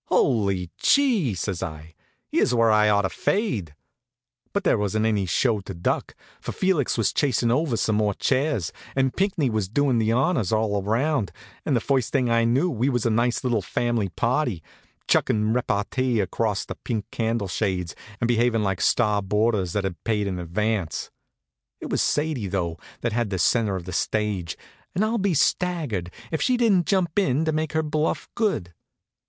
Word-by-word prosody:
"Hully 100 -7 +1
chee!" 230 - +3
says 95 0 -3
I. 80 -2 -7 0.4
"Here's 125 - +2
where 115 -1 +4
I 105 0 +4
ought 100 -1 +3
to 95 - 0
fade." 115 - -1 0.8
But 200 - -1
there 145 - +3
wasn't 105 +2 0
any 105 -4 +1
show 110 - +2
to 95 -1 -8
duck; 85 - -2 0.2
for - - -5
Felix 185 -8 +1
was 115 - +1
chasin' 120 -4 +1
over 135 -2 +1
some 110 -1 +1
more 105 -2 +1
chairs, 135 - 0 0.2
and 130 -1 +1
Pinckney 190 -7 +1
was 105 -4 -1
doin' 130 +1 +2
the 110 0 +1
honors 125 - +1
all 110 -2 +1
round, 115 +3 0 0.4
and 135 - +2
the - - +3
first 130 0 0
thing 125 -4 +1
I 115 0 +3
knew 130 +9 +2
we 130 -5 0
was 120 -3 0
a 115 - +2
nice 120 +3 +1
little 120 -4 +1
fam'ly 115 +1 -1
party, 115 - -1 0.4
chuckin' 105 0 +2
repartee 120 +1 0
across 100 +1 -1
the - - -5
pink 110 -5 -2
candle 115 -2 -1
shades, 90 -3 -2 0.2
and 120 - +1
behavin' 120 -2 +2
like 95 -2 -1
star 105 -3 +2
boarders 105 -2 0
that 105 - 0
had 95 -3 -5
paid 105 -3 0
in 95 -2 -3
advance. 95 0 -2 0.7
It - - -7
was - - +1
Sadie, 150 -8 0
though, 85 -4 -2 0.2
that 115 -2 -1
had 120 -2 0
the 95 - -2
centre 105 +2 +2
of 90 -2 -5
the 90 - -6
stage, 100 -2 -1 0.4
and 200 +5 +2
I'll 225 +1 0
be 195 -3 +1
staggered 150 - 0 0.2
if 160 - -1
she 255 -1 +2
didn't 205 -8 +3
jump 185 -2 +1
in 155 -4 +1
to 160 - +1
make 155 0 -2
her 160 0 +1
bluff 155 +1 -1
good. 155 - -1
115 Hz, 180 wpm, -24 LUFS, 100-140 Hz, 0.8 s, where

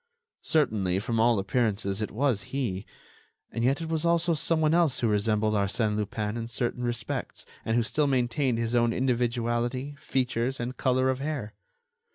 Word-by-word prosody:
Certainly, 105 - +1
from 115 +3 -1
all 115 0 +4
appearances, 100 -1 0
it 105 - -2
was 125 -3 0
he; 110 -8 -2 0.6
and 115 - -2
yet 135 +6 +2
it - - -4
was 160 -1 0
also 170 0 +3
someone 160 0 +2
else 165 -6 +3
who 120 - +1
resembled 105 0 +1
Arsène 105 +1 +1
Lupin 105 +1 -2
in 115 0 -4
certain 120 +1 -2
respects, 120 -3 -3 0.2
and 115 - 0
who 120 - +3
still 150 +6 +1
maintained 130 -1 +1
his 115 0 -1
own 120 -1 +3
individuality, 120 +2 0
features, 130 0 -1
and 120 +2 -3
color 130 0 +2
of 130 - -3
hair. 135 -7 -3
120 Hz, 165 wpm, -27 LUFS, 110-135 Hz, 0.6 s, all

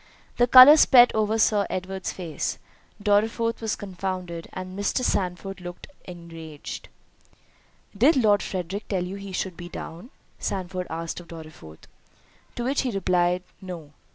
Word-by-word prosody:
The 245 - +4
colour 255 +5 +10
spread 245 -5 +7
over 215 0 +1
Sir 210 -2 +3
Edward's 185 +1 -4
face—Dorriforth 210 - -2
was 225 -1 -1
confounded—and 185 -1 -6
Mr. 205 +5 -1
Sandford 195 -2 -2
looked 175 0 -8 0.2
enraged. 165 -4 -9 1.1
"Did 270 +9 +4
Lord 210 -5 +4
Frederick 190 +2 -5
tell 185 -3 -1
you 190 +2 -6
he 200 -1 -8
should 185 -1 -3
be 175 +1 -9
down?" 170 +6 -8 0.3
Sandford 185 -1 -3
asked 165 +1 -5
of 175 - -13
Dorriforth. 155 - -12 0.7
To 240 - -3
which 270 +3 +1
he 260 - -2
replied, 180 -3 +1 0.2
"No." 170 -6 -9
185 Hz, 130 wpm, -25 LUFS, 175-215 Hz, 1.1 s, colour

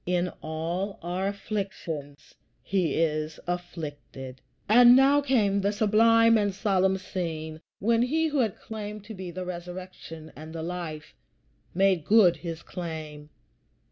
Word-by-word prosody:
"In 180 0 +1
all 170 +5 -3
our 180 +3 -2
afflictions 190 -8 -5 0.3
he 180 -6 0
is 155 -1 -1
afflicted." 145 -7 -6 0.3
And 240 +3 +8
now 275 +2 +5
came 215 -8 +2
the 200 +1 +1
sublime 225 +2 +5
and 205 -2 0
solemn 190 -2 +2
scene 160 -4 -5 0.2
when 230 +3 +2
he 315 +6 +1
who 295 -2 0
had 220 -6 0
claimed 210 -1 -7
to 220 +2 -9
be 185 -3 -7
the 180 +1 -5
Resurrection 175 -2 -8
and 155 +2 -10
the 160 - -4
Life 165 - -6 0.6
made 190 -3 +3
good 190 -3 +5
his 165 0 -6
claim. 155 -4 -7
185 Hz, 135 wpm, -27 LUFS, 160-210 Hz, 0.6 s, And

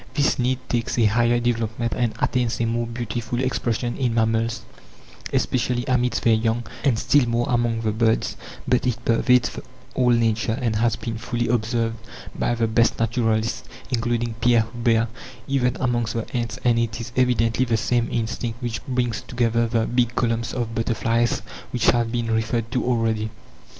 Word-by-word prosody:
This 145 -2 +2
need 125 +1 +1
takes 120 -1 -1
a 115 - +4
higher 120 +3 +3
development 115 -1 -1
and 120 -3 0
attains 120 -2 0
a 115 - +1
more 115 +1 -1
beautiful 120 0 -3
expression 120 -2 -1
in 125 -3 0
mammals, 115 0 +1 0.7
especially 125 0 0
amidst 125 -2 +1
their 115 - +5
young, 115 +1 +1 0.2
and 130 -6 +3
still 130 +1 +3
more 120 +1 +1
among 120 -3 +1
the 110 -1 0
birds; 110 +1 +1 0.3
but 125 0 +2
it 120 -2 0
pervades 125 +2 +3 0.3
all 125 -1 +2
Nature, 115 -1 +2
and 115 -4 0
has 115 -1 +2
been 115 +2 -5
fully 120 0 -2
observed 115 0 0 0.4
by 120 - 0
the 115 -1 +1
best 115 +1 +2
naturalists, 115 0 0 0.3
including 120 -1 0
Pierre 120 -2 +4
Huber, 115 -1 +2 0.4
even 130 -2 +1
amongst 120 -3 0
the 115 - -2
ants, 120 -2 -2
and 120 -2 +3
it 115 -1 -1
is 115 +1 -6
evidently 125 -1 +2
the 115 -2 +1
same 120 +1 0
instinct 115 0 -2
which 120 -3 -4
brings 125 -3 -1
together 115 -1 0
the 115 -1 +1
big 120 0 0
columns 115 -1 0
of 120 -2 -3
butterflies 115 +1 0 0.3
which 125 - +3
have 115 -1 0
been 120 -1 -1
referred 115 +1 -1
to 125 - 0
already. 115 -3 0
115 Hz, 165 wpm, -23 LUFS, 115-120 Hz, 0.7 s, their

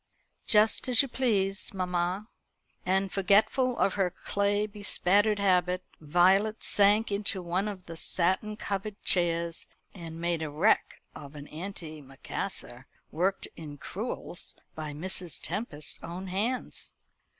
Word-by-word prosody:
"Just 220 +3 +4
as 250 +2 +5
you - - -3
please, 205 -7 0
mamma." 180 +2 -1 0.6
And 190 +1 +2
forgetful 215 +6 +3
of 195 - +2
her 195 -3 +1
clay 200 +3 0
bespattered 205 0 +2
habit, 185 -2 +2 0.2
Violet 190 +7 +3
sank 205 +2 +4
into 200 -1 0
one 180 +4 0
of 190 -3 -6
the 165 - -8
satin 190 +6 0
covered 200 0 -4
chairs, 170 -2 +1 0.3
and 165 -3 -7
made 170 -1 0
a 155 - -2
wreck 160 +9 +2
of 145 0 -10
an 145 -1 -8
antimacassar 155 -5 -5 0.3
worked 185 +4 0
in 150 -3 -8
crewels 195 - -6 0.2
by 155 -1 -5
Mrs. 175 +2 -3
Tempest's 165 -6 -4
own 175 +3 -6
hands. 210 +7 -2
190 Hz, 125 wpm, -29 LUFS, 170-205 Hz, 0.6 s, as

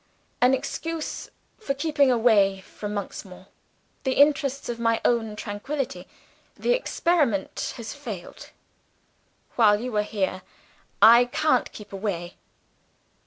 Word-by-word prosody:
"An 250 +2 +5
excuse 325 +4 -5 0.3
for 275 -11 -2
keeping 285 -2 +2
away 210 -5 +3
from 210 +2 -7
Monksmoor 190 -2 -6
in - - -20 0.6
the 265 - 0
interests 280 -1 +2
of 235 -1 -4
my 230 -1 +2
own 225 -3 +1
tranquillity. 255 +7 -4 0.5
The - - -1
experiment 320 - 0
has 230 -2 -6
failed. 225 -11 -8 1.1
While 210 -3 +5
you 245 -1 -5
are - - +4
here, 195 -3 -2 0.6
I 235 +2 +9
can't 255 +1 +1
keep 210 -2 -12
away." 190 -3 -4
235 Hz, 120 wpm, -25 LUFS, 205-275 Hz, 1.1 s, I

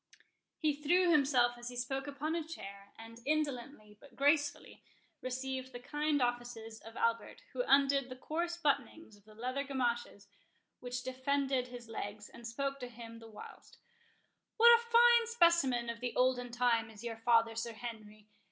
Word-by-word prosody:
He 305 -2 +1
threw 345 +5 +3
himself 255 -5 +3
as 240 0 -6
he 250 - -9
spoke 270 +3 -3
upon 285 +3 -3
a 335 -1 -1
chair, 200 -11 -10
and 225 +1 -11
indolently, 270 -7 -3
but 280 -4 -17
gracefully, 285 +1 +1 0.4
received 260 0 -4
the 245 - -6
kind 295 +2 0
offices, 240 -2 -3
of 225 +1 -12
Albert, 230 0 -1
who - - -1
undid 275 -1 +4
the 255 - -7
coarse 340 +6 -3
buttonings 300 -5 -1
of 205 -1 -23
the 215 0 -16
leathern 255 +5 -3
gamashes 240 -6 -2 0.5
which 250 0 -5
defended 260 0 0
his 245 -1 -10
legs, 210 -2 -6
and 235 - -10
spoke 275 +3 -3
to 250 - -5
him 230 -1 -10
the 225 0 -12
whilst:—"What 470 - 0
a 470 - -1
fine 470 0 +5
specimen 340 - +3
of 230 0 -4
the 245 0 -4
olden 250 -1 +2
time 235 -2 +1
is 220 0 -12
your 230 -1 -4
father, 230 0 +3
Sir 230 +1 -3
Henry! 215 -2 -9
250 Hz, 160 wpm, -34 LUFS, 230-285 Hz, 0.5 s, fine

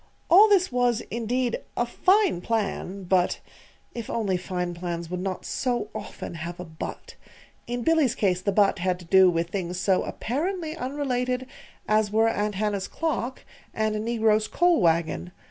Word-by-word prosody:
All 410 +5 +8
this 375 -5 +3
was, 245 -2 +2
indeed, 240 +2 -1 0.2
a 240 - +2
fine 370 - +2
plan; 200 -3 -2
but 180 0 +1 0.5
(If 235 -3 -6
only 205 -5 0
fine 180 -1 -3
plans 170 -1 -5
would 180 - -2
not 185 0 -4
so 240 -5 -1
often 210 -4 -7
have 170 +2 -6
a 180 - -5
"but"!) 160 -1 -7 0.5
In 245 0 -3
Billy's 310 -6 +3
case 185 -3 +1
the 200 - 0
"but" 200 -1 +3
had 180 0 0
to 180 - -13
do 190 +2 +6
with 170 0 -1
things 180 -2 -3
so 190 0 +2
apparently 320 - -3
unrelated 255 -3 -2 0.4
as 215 -1 +2
were 220 +1 +3
Aunt 210 -2 -1
Hannah's 205 -1 -1
clock 285 -6 -3 0.3
and 215 -1 0
a - - -1
negro's 220 -1 +2
coal 350 -6 +3
wagon. 170 +1 +1
215 Hz, 165 wpm, -26 LUFS, 180-245 Hz, 0.5 s, All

